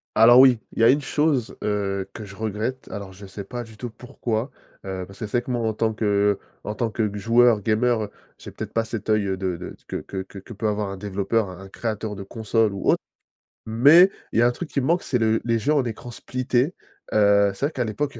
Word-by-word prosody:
Alors 120 Hz, +3 st, +8 dB
oui, 130 Hz, -4 st, +6 dB
il -, -, -6 dB
y -, -, +4 dB
a 115 Hz, -, +7 dB
une 140 Hz, +3 st, +5 dB
chose, 145 Hz, -4 st, 0 dB
heu, 100 Hz, -2 st, -1 dB
que 110 Hz, -, -7 dB
je 100 Hz, 0 st, -11 dB
regrette: 110 Hz, +5 st, -3 dB
alors 100 Hz, -2 st, -7 dB
je 100 Hz, +2 st, -11 dB
sais 95 Hz, +1 st, -8 dB
pas 120 Hz, +3 st, -5 dB
du 110 Hz, -2 st, -14 dB
tout 120 Hz, -, -5 dB
pourquoi, 120 Hz, +1 st, -4 dB, 0.3 s
heu, 95 Hz, -1 st, -5 dB
parce 100 Hz, 0 st, -14 dB
que 110 Hz, -, -3 dB
c'est 110 Hz, +4 st, -1 dB
vrai -, -, +1 dB
que 125 Hz, -, -6 dB
moi, 120 Hz, -2 st, -1 dB
en 110 Hz, -, 0 dB
tant 110 Hz, +1 st, 0 dB
que 100 Hz, -2 st, +2 dB, 0.3 s
en 105 Hz, -, -3 dB
tant 115 Hz, +1 st, -1 dB
que 110 Hz, +1 st, -1 dB
g 105 Hz, -1 st, -2 dB
joueur 115 Hz, +1 st, +4 dB
gamer, 110 Hz, 0 st, +1 dB, 0.3 s
j'ai -, -, -10 dB
peut-être -, -, -7 dB
pas 115 Hz, -, +1 dB
cet 110 Hz, -1 st, -6 dB
œil 105 Hz, -1 st, +3 dB
de 95 Hz, -2 st, -2 dB
de 90 Hz, +2 st, -8 dB
que -, -, -5 dB
que 95 Hz, -, -6 dB, 0.2 s
que 105 Hz, +5 st, -11 dB
peut 110 Hz, +1 st, -2 dB
avoir 105 Hz, -1 st, -1 dB
un 95 Hz, -, -6 dB
développeur, 100 Hz, +1 st, -1 dB
un 90 Hz, 0 st, -10 dB
un 95 Hz, -, -11 dB
créateur 110 Hz, -1 st, -4 dB
de 100 Hz, -, -6 dB
console 110 Hz, 0 st, 0 dB
ou 100 Hz, -, -1 dB
autre, -, -, +3 dB, 0.7 s
mais 145 Hz, -, +7 dB, 0.2 s
il -, -, 0 dB
y -, -, +6 dB
a -, -, +6 dB
un -, -, +4 dB
truc 155 Hz, +6 st, -6 dB
qui 140 Hz, -, 0 dB
me 130 Hz, -, -2 dB
manque, 170 Hz, +2 st, +2 dB
c'est 125 Hz, -, 0 dB
le 110 Hz, -1 st, +2 dB
les 115 Hz, -1 st, +1 dB
jeux 145 Hz, +7 st, +1 dB
en 140 Hz, -3 st, +2 dB
écran 120 Hz, +1 st, -6 dB
splitté. 130 Hz, +5 st, -1 dB, 0.4 s
Heu, 100 Hz, -1 st, +5 dB
c'est 135 Hz, -, -1 dB
vrai 155 Hz, -, -3 dB
qu'à 125 Hz, -, -1 dB
l'époque, 140 Hz, +7 st, -2 dB
il -, -, -10 dB
110 Hz, 255 wpm, -24 LUFS, 100-120 Hz, 0.7 s, Alors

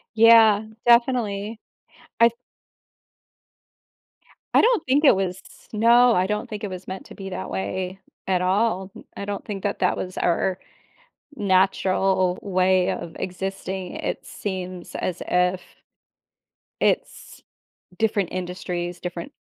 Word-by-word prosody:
Yeah, 225 Hz, -2 st, +7 dB, 0.2 s
definitely. 230 Hz, -3 st, +2 dB, 0.6 s
I 235 Hz, 0 st, +7 dB, 2.2 s
I -, -, +6 dB
don't 465 Hz, -6 st, +3 dB
think 285 Hz, +4 st, +2 dB
it 270 Hz, -, +7 dB
was 190 Hz, -1 st, -2 dB, 0.3 s
no, 235 Hz, +2 st, +5 dB
I 185 Hz, -1 st, +2 dB
don't 210 Hz, 0 st, -3 dB
think 210 Hz, 0 st, -6 dB
it 205 Hz, -, -3 dB
was 185 Hz, 0 st, -8 dB
meant 190 Hz, 0 st, -6 dB
to -, -, -12 dB
be 195 Hz, -1 st, -7 dB
that 100 Hz, -, -5 dB
way 180 Hz, -, -4 dB, 0.3 s
at 185 Hz, -1 st, +1 dB
all, 190 Hz, 0 st, 0 dB
m -, -, -11 dB
I 200 Hz, -, -4 dB
don't 205 Hz, -1 st, -5 dB
think 200 Hz, -3 st, -6 dB
that 205 Hz, -, -2 dB
that 180 Hz, -, +1 dB
was 185 Hz, 0 st, -5 dB
our 180 Hz, +2 st, +1 dB, 0.8 s
natural 190 Hz, -2 st, +2 dB
way 185 Hz, -1 st, +2 dB
of 170 Hz, -1 st, -6 dB
existing, 190 Hz, 0 st, -5 dB
it -, -, -4 dB
seems 185 Hz, -3 st, -6 dB
as 180 Hz, -, -3 dB
if 180 Hz, +1 st, +2 dB, 1.2 s
it's -, -, -1 dB, 0.6 s
different 205 Hz, -4 st, +1 dB
industries, 180 Hz, -1 st, -4 dB
different 175 Hz, -1 st, -6 dB
190 Hz, 125 wpm, -23 LUFS, 180-210 Hz, 2.2 s, Yeah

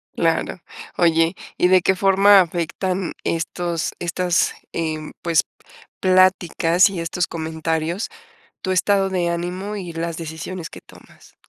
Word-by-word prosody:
Claro. 165 Hz, +2 st, 0 dB, 0.4 s
Oye, 165 Hz, +1 st, +3 dB, 0.2 s
¿y 180 Hz, -, +4 dB
de 185 Hz, -1 st, +5 dB
qué 190 Hz, -, +2 dB
forma 195 Hz, +1 st, +6 dB
afectan 180 Hz, +2 st, -2 dB
estos 170 Hz, 0 st, -2 dB
estas, 175 Hz, 0 st, 0 dB, 0.2 s
em, 155 Hz, -2 st, -3 dB
pues, 170 Hz, -2 st, +3 dB, 0.6 s
pláticas 185 Hz, -1 st, +4 dB
y 185 Hz, -3 st, -5 dB
estos 165 Hz, +1 st, -1 dB
comentarios, 160 Hz, +3 st, -3 dB, 0.5 s
tu 185 Hz, -, -2 dB
estado 195 Hz, +1 st, +2 dB
de 175 Hz, -2 st, 0 dB
ánimo 180 Hz, +4 st, -3 dB
y 180 Hz, -4 st, -6 dB
las 165 Hz, 0 st, -3 dB
decisiones 165 Hz, +2 st, -6 dB
que -, -, -11 dB
tomas? -, -, -19 dB
175 Hz, 125 wpm, -21 LUFS, 165-185 Hz, 0.6 s, forma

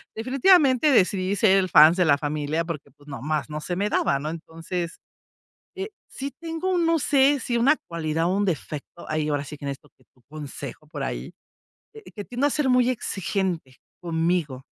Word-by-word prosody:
definitivamente 275 Hz, -, +4 dB
decidí 190 Hz, -4 st, +2 dB
ser 195 Hz, -2 st, +4 dB
el 185 Hz, -1 st, +1 dB
fans 155 Hz, +2 st, +7 dB
de 180 Hz, -, +3 dB
la 145 Hz, -2 st, +4 dB
familia, 150 Hz, +2 st, -1 dB
porque, 150 Hz, -4 st, -6 dB
pues, 145 Hz, +2 st, -23 dB
nomás 150 Hz, +3 st, -3 dB
no 150 Hz, -, -4 dB
se 175 Hz, -, -3 dB
me 205 Hz, +2 st, 0 dB
daba, 140 Hz, -, +1 dB
¿no? 150 Hz, +2 st, -4 dB
Entonces, 165 Hz, +1 st, -5 dB, 0.8 s
eh, 385 Hz, +3 st, -4 dB, 0.2 s
sí 275 Hz, +1 st, -5 dB
tengo, 335 Hz, +3 st, -2 dB
no 330 Hz, -1 st, +2 dB
sé, 280 Hz, 0 st, +3 dB
si 240 Hz, -1 st, -1 dB
una 275 Hz, +6 st, +4 dB
cualidad 165 Hz, -1 st, -1 dB
o -, -, +2 dB
un 205 Hz, -, +1 dB
defecto, 155 Hz, -1 st, -5 dB
ahí 155 Hz, -1 st, -1 dB
ahora 145 Hz, -1 st, -1 dB
sí 150 Hz, +1 st, -9 dB
que 145 Hz, -, -9 dB
necesito 140 Hz, +1 st, -6 dB
que -, -, -27 dB
tu 125 Hz, -, -29 dB
consejo 145 Hz, -1 st, -8 dB
por 150 Hz, -, -7 dB
ahí, -, -, -5 dB, 0.8 s
que 205 Hz, -, -5 dB
tiendo 250 Hz, +4 st, -1 dB
a -, -, +2 dB
ser 290 Hz, -1 st, 0 dB
muy 250 Hz, -1 st, +4 dB
exigente 190 Hz, -, -3 dB, 0.3 s
conmigo, 165 Hz, -5 st, -1 dB
175 Hz, 185 wpm, -24 LUFS, 150-250 Hz, 0.8 s, fans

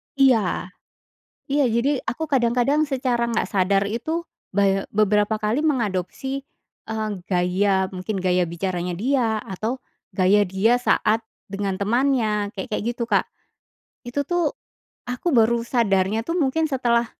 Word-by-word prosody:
Iya, 225 Hz, -9 st, +2 dB, 0.8 s
iya, 285 Hz, +1 st, +2 dB
jadi 255 Hz, +5 st, +1 dB
aku 320 Hz, +6 st, -2 dB
kadang-kadang 260 Hz, +1 st, +2 dB
secara 250 Hz, -3 st, 0 dB
nggak 230 Hz, -, 0 dB
sadar 195 Hz, 0 st, +2 dB
itu 315 Hz, +11 st, -3 dB, 0.3 s
baye 195 Hz, 0 st, +2 dB
beberapa 210 Hz, +1 st, +2 dB
kali 215 Hz, +7 st, 0 dB
mengadopsi, 265 Hz, -, -1 dB, 0.5 s
eee, 220 Hz, -1 st, -2 dB, 0.2 s
gaya 190 Hz, +2 st, +2 dB
mungkin 190 Hz, +3 st, -3 dB
gaya 180 Hz, -1 st, +2 dB
bicaranya 180 Hz, +1 st, -3 dB
dia, 235 Hz, -1 st, +1 dB
atau 215 Hz, +6 st, -4 dB, 0.3 s
gaya 195 Hz, +1 st, +3 dB
dia 195 Hz, +5 st, +2 dB
saat 225 Hz, -2 st, +2 dB, 0.2 s
dengan 195 Hz, -1 st, -3 dB
temannya 220 Hz, -2 st, +1 dB
kek 190 Hz, -, -5 dB
kayak -, -, -1 dB
gitu, 235 Hz, -, -1 dB
Kak. -, -, +2 dB, 0.8 s
Itu 265 Hz, +4 st, -1 dB
tuh, 340 Hz, +1 st, 0 dB, 0.5 s
aku 250 Hz, +8 st, -2 dB
baru 235 Hz, -3 st, +3 dB
sadarnya 220 Hz, -2 st, +1 dB
tuh 335 Hz, -, -1 dB
mungkin 320 Hz, -1 st, +1 dB
setelah, 240 Hz, -4 st, +1 dB
225 Hz, 130 wpm, -23 LUFS, 195-260 Hz, 0.8 s, gaya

